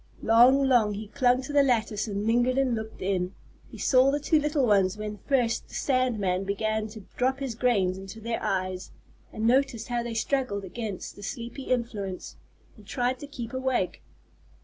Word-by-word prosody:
Long, 255 Hz, +4 st, +6 dB
long 225 Hz, -5 st, +3 dB
he 210 Hz, 0 st, -7 dB
clung 255 Hz, 0 st, +2 dB
to 290 Hz, -, -6 dB
the 290 Hz, -, +6 dB
lattice 225 Hz, -5 st, +1 dB
and 205 Hz, 0 st, -3 dB
lingered 240 Hz, +3 st, +2 dB
and 270 Hz, -2 st, +2 dB
looked 220 Hz, -2 st, -5 dB
in. 185 Hz, -1 st, -1 dB, 0.3 s
He -, -, -11 dB
saw 260 Hz, 0 st, +4 dB
the 290 Hz, +1 st, +1 dB
two 305 Hz, +2 st, +2 dB
little 295 Hz, -2 st, +1 dB
ones 200 Hz, -3 st, +3 dB
when 210 Hz, -1 st, -5 dB
first 245 Hz, -4 st, +1 dB
the -, -, -12 dB
sand 255 Hz, -3 st, +1 dB
man 185 Hz, -2 st, 0 dB
began 215 Hz, +2 st, -1 dB
to 215 Hz, 0 st, -10 dB, 0.2 s
drop 260 Hz, +2 st, +1 dB
his 270 Hz, -4 st, -3 dB
grains 200 Hz, -6 st, +1 dB
into 195 Hz, +3 st, -9 dB
their 230 Hz, +1 st, -3 dB
eyes, 185 Hz, -1 st, -2 dB, 0.4 s
and 215 Hz, -, -3 dB
noticed 245 Hz, -2 st, +2 dB
how 240 Hz, -1 st, 0 dB
they 235 Hz, -1 st, -5 dB
struggled 225 Hz, -4 st, -1 dB
against 210 Hz, 0 st, -6 dB
the -, -, -12 dB
sleepy 235 Hz, +5 st, -6 dB
influence, 215 Hz, -7 st, -3 dB, 0.4 s
and 210 Hz, -3 st, -17 dB
tried 250 Hz, +3 st, -1 dB
to 290 Hz, -, -8 dB
keep 240 Hz, -4 st, -7 dB
awake. 260 Hz, -7 st, -1 dB
230 Hz, 185 wpm, -27 LUFS, 205-255 Hz, 0.4 s, Long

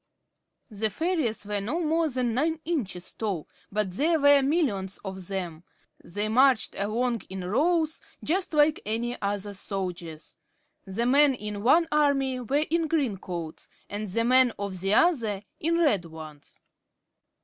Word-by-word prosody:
The 215 Hz, +1 st, 0 dB
fairies 310 Hz, -, -1 dB
were 205 Hz, -1 st, -2 dB
no 240 Hz, -, -2 dB
more 325 Hz, 0 st, +1 dB
than 250 Hz, -3 st, -1 dB
nine 310 Hz, +6 st, 0 dB
inches 225 Hz, -, -3 dB
tall, 200 Hz, -8 st, -3 dB, 0.2 s
but 205 Hz, -2 st, -1 dB
there 320 Hz, +2 st, +2 dB
were 285 Hz, 0 st, +6 dB
millions 265 Hz, -, 0 dB
of 190 Hz, -2 st, -6 dB
them. 175 Hz, -4 st, -4 dB, 0.4 s
They 205 Hz, +5 st, -3 dB
marched 255 Hz, +2 st, +3 dB
along 230 Hz, +3 st, 0 dB
in 190 Hz, -1 st, -5 dB
rows 315 Hz, -, +1 dB, 0.2 s
just 355 Hz, 0 st, -1 dB
like 300 Hz, +1 st, +4 dB
any 235 Hz, +3 st, -3 dB
other 205 Hz, 0 st, -2 dB
soldiers. 180 Hz, -5 st, -5 dB, 0.5 s
The 195 Hz, +5 st, -2 dB
men 275 Hz, +2 st, +5 dB, 0.2 s
of 200 Hz, -, -5 dB
one 325 Hz, +9 st, +4 dB
army 275 Hz, -3 st, +2 dB
were 280 Hz, +5 st, 0 dB
in 330 Hz, -1 st, +2 dB
green 285 Hz, -10 st, 0 dB
coats, 170 Hz, -4 st, -7 dB, 0.2 s
and 210 Hz, +1 st, -3 dB
the 230 Hz, +5 st, 0 dB
men 255 Hz, -1 st, +5 dB
of 195 Hz, -2 st, -4 dB
the 195 Hz, +2 st, +2 dB
other 225 Hz, -, +2 dB, 0.2 s
in 335 Hz, +2 st, +1 dB
red 280 Hz, -, +2 dB
ones. 155 Hz, -3 st, -11 dB
230 Hz, 150 wpm, -27 LUFS, 195-295 Hz, 0.5 s, were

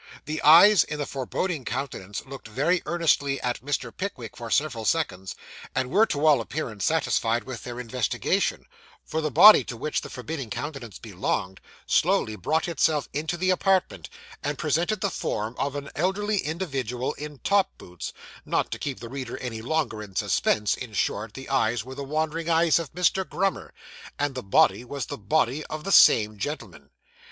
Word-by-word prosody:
The 155 Hz, +1 st, -3 dB
eyes 175 Hz, +7 st, +8 dB
in 150 Hz, -, -5 dB
the 145 Hz, -, -2 dB
forbidding 140 Hz, +4 st, -3 dB
countenance 115 Hz, -6 st, -5 dB
looked 135 Hz, -2 st, -9 dB
very 145 Hz, +11 st, +1 dB
earnestly 150 Hz, -5 st, +1 dB
at 125 Hz, 0 st, -2 dB
Mr. 145 Hz, +1 st, -3 dB
Pickwick, 130 Hz, -, -5 dB
for 115 Hz, -1 st, -7 dB
several 130 Hz, -3 st, 0 dB
seconds, 95 Hz, -, -1 dB, 0.4 s
and 130 Hz, -1 st, -1 dB
were 215 Hz, +5 st, +5 dB
to 145 Hz, +1 st, -1 dB
all 145 Hz, -6 st, +5 dB
appearance 115 Hz, -5 st, -4 dB
satisfied 120 Hz, -7 st, +1 dB
with 130 Hz, -2 st, -7 dB
their 120 Hz, 0 st, -6 dB
investigation; 125 Hz, -2 st, -1 dB, 0.4 s
for 160 Hz, -, -2 dB
the 155 Hz, -, -1 dB
body 210 Hz, -, +9 dB
to 120 Hz, -, -6 dB
which 155 Hz, +6 st, -2 dB
the -, -, -8 dB
forbidding 135 Hz, -1 st, -6 dB
countenance 135 Hz, -, -6 dB
belonged, 95 Hz, -2 st, -3 dB, 0.2 s
slowly 110 Hz, -, +2 dB
brought 155 Hz, -, 0 dB
itself 155 Hz, -3 st, +1 dB
into 160 Hz, +4 st, -2 dB
the 185 Hz, +1 st, +2 dB
apartment, 185 Hz, -, +1 dB, 0.3 s
and 145 Hz, 0 st, -2 dB
presented 175 Hz, +7 st, 0 dB
the 200 Hz, -, 0 dB
form 110 Hz, -6 st, -3 dB
of 140 Hz, +1 st, -1 dB
an 140 Hz, 0 st, -6 dB
elderly 200 Hz, +6 st, 0 dB
individual 135 Hz, -, -3 dB
in 150 Hz, -1 st, -8 dB
top 200 Hz, +6 st, +2 dB
boots 90 Hz, -1 st, -8 dB, 0.3 s
not -, -, -1 dB
to -, -, -4 dB
keep 140 Hz, -3 st, -4 dB
the 120 Hz, -, -6 dB
reader 130 Hz, -1 st, -6 dB
any 115 Hz, -3 st, -5 dB
longer 140 Hz, -4 st, -1 dB
in 100 Hz, -3 st, -11 dB
suspense, 105 Hz, +2 st, +1 dB
in 120 Hz, -4 st, -7 dB
short, 105 Hz, +1 st, -2 dB
the 135 Hz, -, -8 dB
eyes 120 Hz, -4 st, +1 dB
were 130 Hz, -, -8 dB
the 140 Hz, -, -6 dB
wandering 160 Hz, +3 st, -2 dB
eyes 165 Hz, 0 st, +4 dB
of 165 Hz, -5 st, -6 dB
Mr. 180 Hz, +2 st, +2 dB
Grummer, 185 Hz, +2 st, -2 dB, 0.5 s
and 145 Hz, -1 st, -1 dB
the 130 Hz, -, -4 dB
body 100 Hz, +1 st, +3 dB
was 135 Hz, 0 st, -5 dB
the -, -, -6 dB
body 130 Hz, +6 st, +1 dB
of 155 Hz, 0 st, -6 dB
the 195 Hz, -, -3 dB
same 105 Hz, -, +6 dB
gentleman. 145 Hz, +9 st, -6 dB
140 Hz, 175 wpm, -26 LUFS, 115-160 Hz, 0.5 s, body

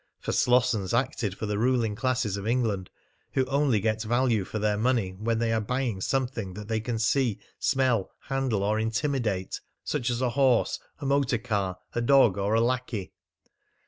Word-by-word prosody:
For -, -, -3 dB
Slossons 125 Hz, -5 st, +2 dB
acted 120 Hz, -5 st, -1 dB
for -, -, -3 dB
the 105 Hz, -1 st, -1 dB
ruling 120 Hz, -2 st, +2 dB
classes 120 Hz, -2 st, 0 dB
of 100 Hz, +1 st, -5 dB
England, 110 Hz, -6 st, 0 dB, 0.4 s
who 130 Hz, -, +2 dB
only 135 Hz, -4 st, +2 dB
get 110 Hz, +1 st, 0 dB
value 120 Hz, -1 st, +1 dB
for 110 Hz, -, -5 dB
their 105 Hz, -1 st, +1 dB
money 115 Hz, -3 st, +1 dB
when 110 Hz, +5 st, -1 dB
they 115 Hz, 0 st, +1 dB
are 110 Hz, -, +1 dB
buying 120 Hz, -3 st, -2 dB
something 120 Hz, -6 st, -2 dB
that 105 Hz, 0 st, -7 dB
they 110 Hz, -1 st, 0 dB
can 115 Hz, +1 st, -3 dB
see, 115 Hz, 0 st, +1 dB, 0.2 s
smell, 130 Hz, -7 st, +1 dB
handle, 135 Hz, -7 st, -1 dB
or 105 Hz, +2 st, +1 dB
intimidate 110 Hz, -4 st, -1 dB, 0.2 s
such 125 Hz, -, -1 dB
as 120 Hz, -1 st, -1 dB
a 130 Hz, -1 st, +1 dB
horse, 130 Hz, -2 st, +2 dB, 0.2 s
a -, -, -4 dB
motor 135 Hz, -3 st, +2 dB
car, 100 Hz, -4 st, -2 dB, 0.2 s
a 120 Hz, -, 0 dB
dog, 120 Hz, -6 st, +5 dB
or 100 Hz, +3 st, +1 dB
a 115 Hz, -, +4 dB
lackey. 120 Hz, -5 st, -2 dB
115 Hz, 175 wpm, -27 LUFS, 105-130 Hz, 0.4 s, dog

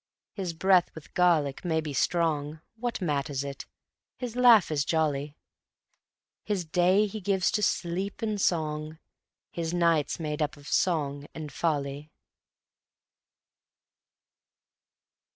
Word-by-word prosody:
His 185 Hz, -4 st, -4 dB
breath 185 Hz, +1 st, +3 dB
with 160 Hz, -, -12 dB
garlic 160 Hz, -6 st, +2 dB
may 160 Hz, -3 st, +1 dB
be 155 Hz, -2 st, -4 dB
strong, 155 Hz, 0 st, 0 dB, 0.2 s
What 235 Hz, -3 st, -3 dB
matters 145 Hz, -3 st, -1 dB
it? 140 Hz, -1 st, -7 dB, 0.5 s
his 245 Hz, -2 st, -5 dB
laugh 240 Hz, -8 st, +6 dB
is 145 Hz, -2 st, +1 dB
jolly; 150 Hz, -2 st, -1 dB, 1.1 s
His 200 Hz, -5 st, -2 dB
day 180 Hz, +5 st, +3 dB
he 210 Hz, +1 st, -6 dB
gives 190 Hz, -1 st, +1 dB
to 210 Hz, -, 0 dB
sleep 190 Hz, +2 st, -1 dB
and 210 Hz, -2 st, -1 dB
song: 155 Hz, -2 st, -1 dB, 0.5 s
His 170 Hz, 0 st, -3 dB
night's 170 Hz, -4 st, +2 dB
made 150 Hz, -1 st, -3 dB
up 150 Hz, 0 st, -1 dB
of 145 Hz, 0 st, -14 dB
song 145 Hz, -5 st, 0 dB
and 155 Hz, -2 st, -6 dB
folly. 145 Hz, -1 st, -2 dB
160 Hz, 115 wpm, -28 LUFS, 150-185 Hz, 1.1 s, laugh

